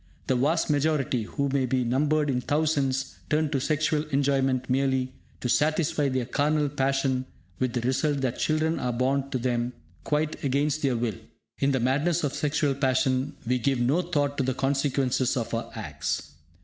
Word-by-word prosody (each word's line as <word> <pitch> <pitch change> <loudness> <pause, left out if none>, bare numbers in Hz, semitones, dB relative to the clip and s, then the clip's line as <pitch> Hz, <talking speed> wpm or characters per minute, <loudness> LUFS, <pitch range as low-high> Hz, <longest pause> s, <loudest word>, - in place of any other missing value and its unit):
The 130 - +1
vast 150 +7 +2
majority, 145 -5 +1
who 140 +5 -2
may 135 -1 +1
be 130 0 +1
numbered 150 +5 +1
in 125 -1 0
thousands, 140 -3 0
turn 150 0 +1
to 135 - +1
sexual 155 +1 +1
enjoyment 135 -3 +1
merely 130 0 +1 0.3
to - - -1
satisfy 150 +1 +2
their 130 -2 -1
carnal 145 +3 +1
passion, 135 -2 0 0.3
with 130 -2 0
the 120 - -1
result 135 +3 0
that 130 -2 -1
children 155 +1 +1
are 125 - -1
born 135 +3 0
to 130 - -1
them 120 0 -1 0.3
quite 150 - -1
against 140 +2 +1
their 130 -4 +1
will. 115 -4 -2 0.4
In 140 0 +2
the 130 - +1
madness 145 +8 +1
of 145 - 0
sexual 145 -1 +1
passion, 130 0 +1
we 125 +2 +1
give 135 +1 +1
no 135 +9 +2
thought 145 -5 -1
to - - +2
the 130 -1 -1
consequences 135 -2 +1
of 115 -1 -3
our 115 - -2
acts. 80 -11 -4
135 Hz, 175 wpm, -26 LUFS, 130-150 Hz, 0.4 s, vast